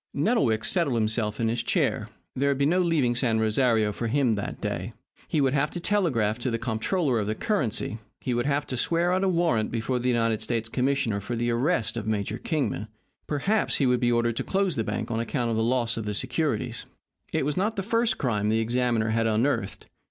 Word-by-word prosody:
Nettlewick 140 - +2
settled 170 -9 +1
himself 110 -1 0
in 115 - +1
his 115 +1 0
chair. - - 0 0.3
There 140 +2 +1
would 140 - +1
be 140 - +2
no 175 +5 +3
leaving 160 -9 +2
San 120 -2 +1
Rosario 110 -1 +2
for 115 +3 -3
him 125 -1 +2
that 100 -1 -4
day. - - -3 0.3
He 155 - 0
would 135 -2 +2
have 145 +1 +1
to 175 - -5
telegraph 135 - +1
to 125 - -1
the 115 - -1
Comptroller 120 - 0
of 105 - -2
the 110 - -1
Currency; 120 - -1 0.2
he 125 - -2
would 120 +2 0
have 145 0 +1
to 130 - -4
swear 170 +7 +1
out 185 +1 +1
a 195 - +3
warrant 165 -12 +1
before 120 +2 -1
the 125 +1 0
United 115 -2 +1
States 115 0 -2
Commissioner 125 -4 0
for 120 +4 -4
the 120 +1 0
arrest 120 - 0
of 110 - -4
Major 105 +1 -1
Kingman; 145 -8 -2 0.4
perhaps 195 +9 +1
he 140 - +2
would 125 -1 +3
be 120 -1 +2
ordered 120 -1 +1
to - - -1
close 195 -4 0
the 115 - 0
bank 105 +2 -3
on 115 - -1
account 115 +1 -1
of - - 0
the 110 - +1
loss 120 -1 0
of 115 - -3
the 105 - -1
securities. 130 -1 -2 0.4
It - - 0
was 150 - -1
not 210 +4 0
the 195 - -2
first 230 +3 +1
crime 105 -5 0
the 110 - +2
examiner 115 -1 +1
had 115 0 +1
unearthed. 115 -1 0
120 Hz, 220 wpm, -26 LUFS, 110-145 Hz, 0.4 s, no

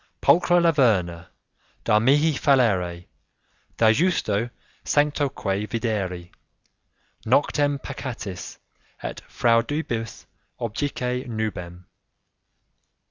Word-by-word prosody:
'Pulchra 175 +1 +4
Laverna, 105 - +2 0.6
Da 105 - +4
mihi 145 +7 +3
fallere; 100 - +2 0.7
da 110 -1 +5
justo 115 - +1 0.3
sanctoque 140 -9 0
videri; 95 -7 -3 0.9
Noctem 145 +4 +2
peccatis, 115 -9 -7 0.5
et - - -5
fraudibus 115 -1 0 0.3
objice 125 +2 -3
nubem. 90 -6 -5
115 Hz, 70 wpm, -24 LUFS, 100-140 Hz, 0.9 s, da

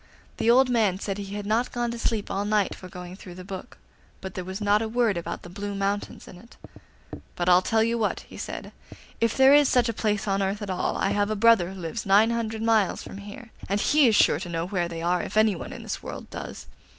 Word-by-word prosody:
The 230 - +1
old 255 +2 +6
man 215 -6 +2
said 200 0 -4
he 200 0 -6
had 205 -1 -5
not 225 +4 0
gone 240 -1 -2
to 235 - -6
sleep 220 -3 -1
all 195 - -1
night 210 -1 +1
for 185 - -11
going 180 0 -9
through 180 -2 -11
the 185 - -9
book, 190 +4 -8 0.4
but 190 - -7
there 185 - -5
was 190 +2 -6
not 205 0 +2
a 225 - -1
word 230 -3 +1
about 170 - -5
the - - -9
Blue 200 +1 -5
Mountains 200 +1 -3
in 180 - -12
it. 235 +4 -18 0.8
'But 175 - -2
I'll 180 0 +6
tell 220 +3 +2
you 230 +1 0
what,' 215 - -1
he - - -15
said, - - -6 0.5
'if 230 -1 +1
there 265 +1 +7
is 290 -1 +6
such 245 -2 +3
a - - -1
place 210 -1 -1
on 195 0 +1
earth 195 +2 -1
at 200 - -4
all, 185 - -1
I 195 - 0
have 205 0 +1
a 215 - -1
brother 215 -4 +4
who 190 - -9
lives 175 +7 -4
nine 205 +3 +4
hundred 225 -1 -2
miles 220 -5 +2
from 195 - -9
here, 220 +4 -10 0.2
and 200 +1 +1
he 295 +4 +4
is 220 - +3
sure 145 - +4
to 175 0 -6
know 165 0 -2
where 180 -2 -1
they 165 -1 -6
are, 175 +1 +1
if - - -5
anyone 215 -5 +2
in - - -8
this - - -5
world - - -8
does. - - -7
205 Hz, 255 wpm, -26 LUFS, 190-225 Hz, 0.8 s, there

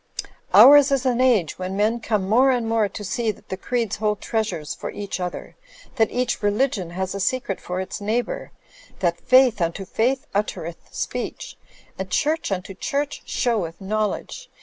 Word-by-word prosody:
Ours 285 0 +8
is 270 -1 +1
an 250 -1 +2
age 225 -13 +2
when 185 +1 -3
men 220 +3 +2
come 215 -4 -1
more 250 +6 +5
and 245 -3 +1
more 225 -2 +2
to 210 - -7
see 220 +4 -1
that 215 - -6
the - - -2
creeds 230 +1 -2
hold 210 -1 0
treasures 215 -9 -2
for - - -6
each 200 -2 -5
other, 180 -1 -5 0.4
that 225 -1 +3
each 250 0 -1
religion 205 -3 0
has 190 +2 -3
a 200 - -4
secret 205 -1 -1
for 180 +1 -4
its 190 +3 -5
neighbour, 225 +4 -2 0.5
that 170 -2 -1
faith 255 -6 +5
unto 170 +3 -1
faith 255 +7 0
uttereth 175 -5 -3
speech, - - -4 0.4
and 190 0 -4
church 305 - 0
tmto 195 0 -4
church 285 +1 -2
showeth 205 -10 -1
knowledge. 215 - -3
215 Hz, 170 wpm, -23 LUFS, 190-245 Hz, 0.5 s, Ours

